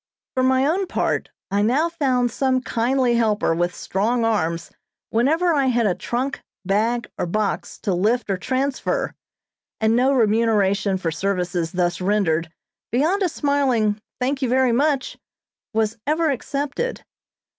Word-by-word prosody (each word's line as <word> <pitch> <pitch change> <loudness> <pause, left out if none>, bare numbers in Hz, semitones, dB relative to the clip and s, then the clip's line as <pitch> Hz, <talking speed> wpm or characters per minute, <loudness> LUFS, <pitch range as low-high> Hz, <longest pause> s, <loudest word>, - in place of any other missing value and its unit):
For 260 - 0
my 260 +1 +3
own 365 +6 +1
part, - - -1 0.2
I 200 +1 +2
now 260 +10 +2
found 260 -7 0
some 260 +1 +1
kindly 250 +1 +1
helper 215 -6 +2
with 175 +2 -1
strong 225 +5 0
arms 170 -7 -1 0.4
whenever 320 +10 +2
I 280 -3 +2
had 240 -2 +2
a 195 - +3
trunk, 255 +8 -3 0.2
bag, 220 +5 +1
or - - -1
box 210 +3 -2
to 195 - 0
lift 215 +6 +1
or 190 - 0
transfer, 265 +6 -1 0.7
and 220 +1 +3
no 255 +3 +3
remuneration 210 -4 +2
for 170 -3 -2
services 180 -2 -2
thus 175 -1 0
rendered 175 -5 +1 0.4
beyond 320 - +2
a 370 - +2
smiling, 260 -9 +1 0.2
"thank 265 +2 -1
you 260 - 0
very 260 0 +3
much," 275 +2 0 0.5
was 220 0 0
ever 315 +1 +2
accepted. 285 - -3
235 Hz, 145 wpm, -22 LUFS, 200-270 Hz, 0.7 s, my